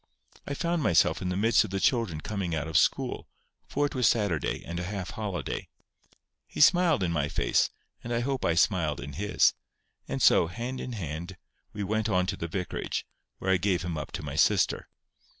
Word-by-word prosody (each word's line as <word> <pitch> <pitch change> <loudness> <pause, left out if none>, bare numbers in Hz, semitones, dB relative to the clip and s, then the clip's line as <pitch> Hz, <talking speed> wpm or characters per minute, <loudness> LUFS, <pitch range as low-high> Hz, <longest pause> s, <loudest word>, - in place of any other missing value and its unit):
I 140 - -3
found 170 +2 0
myself 85 - +3
in 90 - -2
the 90 - -1
midst 115 +4 +4
of 110 - -6
the 95 +1 -2
children 95 - +1
coming 95 -5 -3
out 80 0 -2
of 80 - -7
school, - - +2 0.4
for 145 +1 0
it 145 - -3
was 125 -2 +3
Saturday, 100 - 0
and 85 +1 -4
a - - -3
half 95 0 -4
holiday. 95 -9 -4 0.8
He - - -8
smiled 170 - +5
in 85 - 0
my 75 -3 0
face, - - +2 0.3
and 120 - -6
I 120 0 +1
hope 135 +1 -2
I 85 - +2
smiled 85 -5 +2
in 70 0 -7
his; 105 +7 +2 0.5
and - - -3
so, - - +5
hand 120 +8 -5
in 125 - -5
hand, 85 -1 -5 0.3
we 105 -1 -4
went 110 +2 0
on 90 -2 +2
to 100 +1 -2
the 85 - -4
vicarage, 90 +2 -3 0.3
where 95 - -1
I 95 - +5
gave 90 -1 0
him 90 -2 -3
up 75 - -5
to - - -4
my 75 0 -5
sister. 75 - +2
95 Hz, 205 wpm, -28 LUFS, 85-115 Hz, 0.8 s, smiled